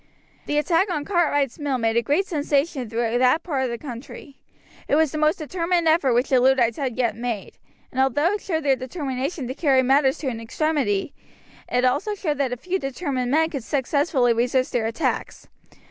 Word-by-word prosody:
The 295 - 0
attack 330 +6 +2
on 300 -5 -2
Cartwright's 295 -9 +1
mill 285 -3 -1
made 225 -1 0
a 235 - +4
great 290 +11 +1
sensation 290 - -1
through 230 +1 0
that 255 +6 +3
part 275 -7 -1
of - - -2
the 235 - -4
country. 270 +2 -9 0.5
It - - +2
was 315 -2 +3
the 310 - -3
most 305 +1 +2
determined 340 +1 -1
effort 315 -5 +3
which 245 +3 +1
the 260 - +4
Luddites 250 -3 +3
had 260 -4 -3
yet 245 -3 +1
made, 230 -3 -5 0.3
and 260 - 0
although 290 - +2
it 415 - -3
showed 320 -4 -2
their 275 -2 +3
determination 265 +1 -4
to 255 - -3
carry 270 -3 +3
matters 270 +1 +3
to 290 - -5
an 230 -2 -5
extremity, 255 -4 -1 0.6
it 250 +1 +2
also 405 +12 0
showed 305 -8 -2
that 270 -3 0
a 250 - -3
few 370 +8 -2
determined 270 -3 -3
men 320 +4 +2
could 275 -6 -4
successfully 275 -1 +1
resist 250 +2 +1
their 225 -2 0
attacks. 230 +7 -3
275 Hz, 195 wpm, -23 LUFS, 250-310 Hz, 0.6 s, a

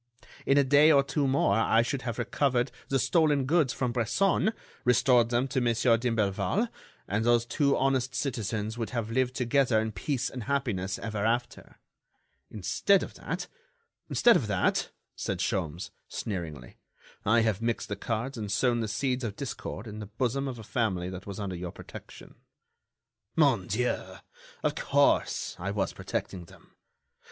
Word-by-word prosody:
In 135 - +4
a 140 - +6
day 145 +4 +6
or 140 -2 +5
two 140 +1 0
more, 130 -6 +2
I 115 0 +4
should 135 +2 -2
have 115 -4 -4
recovered 130 -3 0 0.2
the 135 - +1
stolen 145 +1 +2
goods 150 -2 +3
from 125 -2 -1
Bresson, 180 - +2 0.3
restored 125 -1 +4
them 120 +2 +1
to 130 -1 0
Monsieur 120 0 +3
d'Imblevalle, 115 - 0 0.4
and 105 +3 0
those 120 0 +3
two 140 +4 +1
honest 130 -1 +1
citizens 110 -3 -2
would 115 - -2
have 115 -3 -3
lived 130 +1 0
together 125 -2 +2
in 110 0 -2
peace 125 +6 -2
and 125 -4 -6
happiness 115 -9 -1
ever 110 -3 -4
after. 120 +2 -2 0.7
Instead 180 - +2
of - - -8
that—" - - -5 0.6
"Instead 235 -1 +5
of 115 - +1
that," 95 -3 +1 0.3
said - - -3
Sholmes, 85 -1 -2 0.2
sneeringly, 80 - -6 0.5
"I 115 +3 +4
have 110 -2 0
mixed 115 0 -1
the 105 - -3
cards 115 +5 -3
and 105 -2 -4
sown 120 +3 +2
the 110 - -1
seeds 125 +5 -1
of 105 -4 -3
discord 100 - -6
in 105 -1 -7
the 105 - -6
bosom 130 +5 -1
of 130 -2 -5
a 110 - -9
family 95 -6 -1
that 95 +1 -8
was 100 0 -6
under 100 -3 -3
your 90 0 -5
protection." - - -12 1.0
"Mon - - +3
Dieu! - - 0 0.6
of - - +1
course, - - +1
I 95 +3 -3
was 100 -3 -1
protecting 90 -3 -4
them. - - -19
120 Hz, 165 wpm, -28 LUFS, 105-135 Hz, 1.0 s, a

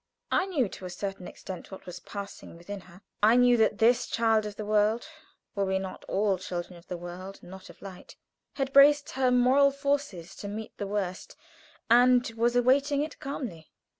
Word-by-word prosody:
I 380 - +2
knew 290 - +1
to 185 - -10
a - - -5
certain 195 0 -5
extent 185 -2 -9
what 190 - -10
was 180 - -8
passing 200 -4 -9
within 195 +4 -8
her. 180 +2 -16 0.2
I 220 +3 +6
knew 245 0 +5
that 220 -2 +2
this 240 +3 +3
child 225 -2 +2
of 205 - -8
the 215 - -6
world 215 +4 +1 0.5
were 200 - -1
we 190 0 0
not 190 -1 -6
all 195 -2 0
children 180 -1 -5
of 170 0 -16
the 180 - -5
world, 180 +3 -8
and 175 - -12
not 190 0 -11
of - - -15
light? 190 -2 -11 0.4
had 270 -1 -2
braced 290 +1 +6
her 260 -1 +1
moral 255 +3 +5
forces 280 - -2
to 205 - -7
meet 215 +2 -7
the 200 - -3
worst, 195 -3 -4 0.5
and 245 +1 +5
was 235 +2 0
awaiting 280 +4 +3
it 305 - -7
calmly. 235 - -6
215 Hz, 195 wpm, -28 LUFS, 190-250 Hz, 0.5 s, I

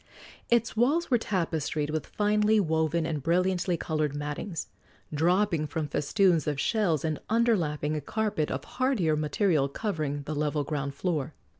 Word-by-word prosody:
Its 235 -2 +2
walls 280 +8 +2
were 245 - +4
tapestried 160 -7 -1
with 155 -1 -3
finely 210 +1 +2
woven 160 -2 +1
and 155 -3 -2
brilliantly 180 +2 +1
colored 155 -3 -1
mattings, 150 +4 -4 0.5
dropping 170 +1 +2
from 155 0 -3
festoons 160 +3 +2
of 145 -2 -1
shells 175 - +1
and 155 -2 -1
underlapping 175 -10 +1
a 150 - -2
carpet 210 -2 -1
of 130 +1 -3
hardier 240 - +1
material 150 -1 +1
covering 150 -6 -3
the 155 - -4
level 150 0 0
ground 140 -1 -3
floor. 155 -4 -2
160 Hz, 145 wpm, -28 LUFS, 150-205 Hz, 0.5 s, were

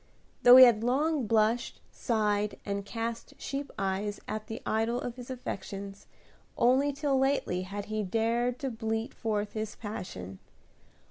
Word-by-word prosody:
Though 245 0 +9
he 260 0 +12
had 225 -3 +3
long 275 +1 +1
blushed, 225 +2 +1
sighed, 210 -3 0
and 200 0 -2
cast 230 +3 -5
sheep's 280 +1 -4
eyes 195 +1 -2
at 215 0 -4
the 225 - -5
idol 225 +2 0
of 245 -1 -5
his 250 -1 -10
affections, 200 -5 -6 0.5
only 265 +4 +4
till 280 -1 0
lately 270 -9 +1
had 200 +2 -5
he 215 0 -2
dared 230 +5 0
to 270 -2 -2
bleat 225 0 -3
forth 210 -2 -2
his 215 0 -4
passion. 95 - -7
225 Hz, 145 wpm, -29 LUFS, 205-245 Hz, 0.5 s, he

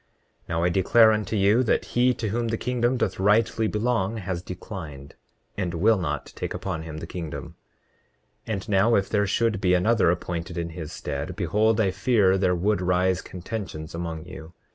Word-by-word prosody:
29:6 - - -28
Now 85 0 0
I 90 - +3
declare 110 +5 +5
unto 110 0 -1
you 105 +4 +4
that 125 - +1
he 125 +1 +4
to 110 -2 -3
whom 115 +3 -1
the 115 0 -1
kingdom 125 +1 0
doth 95 -6 -1
rightly 110 +2 +3
belong 110 -1 0
has 95 -4 -4
declined, 80 -7 -8 0.4
and 90 -3 -2
will 105 +5 +3
not 75 -5 -2
take - - -4
upon 80 - -4
him 80 -1 -7
the 80 - -6
kingdom. 85 -2 -6 0.9
29:7 110 - -1
And 95 +3 -7
now 105 +4 +4
if 100 - +1
there 105 -1 +1
should 110 0 +1
be 90 -1 +3
another 110 +2 +3
appointed 85 0 -3
in 85 0 -2
his 80 -1 -7
stead, 70 +5 -5
behold 105 +4 +1
I 100 -4 +2
fear 100 -1 +3
there 95 -2 +2
would 100 +3 +1
rise 90 0 +1
contentions 90 -4 -6
among 85 -1 -5
you. 85 -1 -10
95 Hz, 185 wpm, -25 LUFS, 85-110 Hz, 0.9 s, declare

